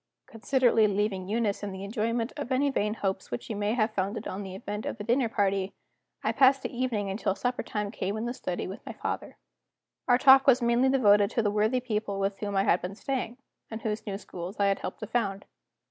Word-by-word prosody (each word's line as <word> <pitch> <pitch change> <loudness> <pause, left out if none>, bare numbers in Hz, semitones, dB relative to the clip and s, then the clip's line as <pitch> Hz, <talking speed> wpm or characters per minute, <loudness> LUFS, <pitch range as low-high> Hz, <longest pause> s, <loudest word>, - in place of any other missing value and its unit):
Considerately 240 -2 +2
leaving 200 -2 -1
Eunice 215 -2 0
in 205 -1 -4
the 190 0 -7
enjoyment 225 +3 -1
of 285 -3 -5
any 275 +2 +2
vain 210 -4 0
hopes 195 -3 -3
which 120 - -4
she - - -5
may 205 +2 0
have 215 -2 +1
founded 200 +3 -2
on 190 - -4
the 190 -2 -7
event 210 +1 -5
of - - -4
the 205 - -6
dinner 240 +2 +2
party, 195 -3 0 0.5
I - - +1
passed 270 0 +4
the - - -5
evening 230 -6 -1
until 195 -1 -1
supper 245 +3 -1
time 210 -1 -3
came 200 -1 -3
in 220 - -3
the 240 - -2
study 180 -8 -4
with 190 - -8
my - - -7
father. - - -5 0.7
Our 245 -1 +5
talk 270 +1 +7
was 260 -2 +7
mainly 240 +2 +3
devoted 205 -6 +5
to 230 - 0
the 205 - +1
worthy 215 +5 +1
people 210 -4 -2
with 195 0 -1
whom 205 -1 -3
I 195 - +3
had 175 - +3
been 185 +2 -5
staying, 250 -1 -3 0.3
and 220 0 -7
whose 215 0 -3
new 195 -1 -2
schools 185 0 -8
I 200 - +3
had 195 0 +2
helped - - -6
to - - -3
found. 200 -3 -2
215 Hz, 225 wpm, -28 LUFS, 200-240 Hz, 0.7 s, talk